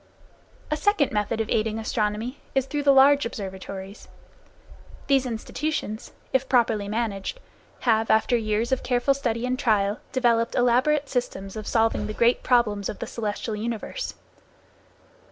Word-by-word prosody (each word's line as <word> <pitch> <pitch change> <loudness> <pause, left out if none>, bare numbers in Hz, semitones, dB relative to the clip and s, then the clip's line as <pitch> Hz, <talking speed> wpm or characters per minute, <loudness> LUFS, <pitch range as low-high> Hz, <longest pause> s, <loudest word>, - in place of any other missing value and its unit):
A 305 - +1
second 370 -7 +2
method 210 +1 -1
of 220 - -3
aiding 220 0 +1
astronomy 220 +3 -2 0.2
is 270 -1 +2
through 290 +2 -2
the 280 -1 +5
large 280 +1 +6
observatories. 195 -2 -7 1.0
These 270 -2 +2
institutions, 230 0 -4 0.2
if 265 0 +1
properly 225 -5 +2
managed, 215 - -3 0.4
have 225 -2 +2
after 220 +3 +3
years 220 +1 0
of 260 - +1
careful 250 +2 +2
study 240 -3 -2
and 255 +1 -1
trial 210 -5 +1
developed 235 -2 +2
elaborate 260 +5 +3
systems 195 -7 -3
of 215 -1 -6
solving 225 -1 +1
the 215 - -5
great 235 +1 +3
problems 215 -5 +2
of - - -5
the - - -4
celestial 215 0 -3
universe. 230 - -4
230 Hz, 140 wpm, -25 LUFS, 215-260 Hz, 1.0 s, large